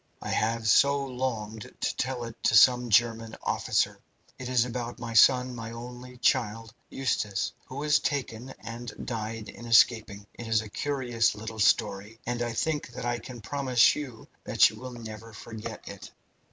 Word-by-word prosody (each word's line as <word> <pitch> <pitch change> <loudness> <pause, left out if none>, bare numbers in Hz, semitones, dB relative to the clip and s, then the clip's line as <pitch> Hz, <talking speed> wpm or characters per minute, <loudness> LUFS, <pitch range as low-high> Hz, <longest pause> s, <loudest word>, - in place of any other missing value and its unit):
I - - -6
have 115 0 0
so 140 +7 +5
longed 115 -5 -4
to - - -1
tell 130 -2 -2
it 115 -1 -7
to - - +4
some 125 +2 +6
German 115 0 +2
officer. - - 0 0.4
It 125 - -5
is 125 -2 +3
about 120 -1 -5
my 115 -1 -6
son, 125 +3 +5
my 115 -2 -6
only 125 +1 -9
child, 115 -1 0 0.2
Eustace, 110 -6 -1 0.2
who 130 - -9
was 150 +2 +2
taken 135 -5 -3
and 115 +1 -7
died 110 -2 -4
in 120 - -10
escaping. 110 -3 +4
It 120 - -8
is 110 -1 +2
a 110 - -10
curious 120 -4 0
little 110 +1 -7
story, 105 +1 +1
and 120 0 -2
I 120 -1 -1
think 150 +5 -1
that 125 0 -6
I 120 0 -1
can 120 +1 -10
promise 130 -2 +3
you 130 -6 -7 0.2
that - - +5
you - - -12
will 130 -1 -8
never 115 -1 -9
forget 110 +1 -8
it. - - -9
115 Hz, 170 wpm, -28 LUFS, 110-125 Hz, 0.4 s, some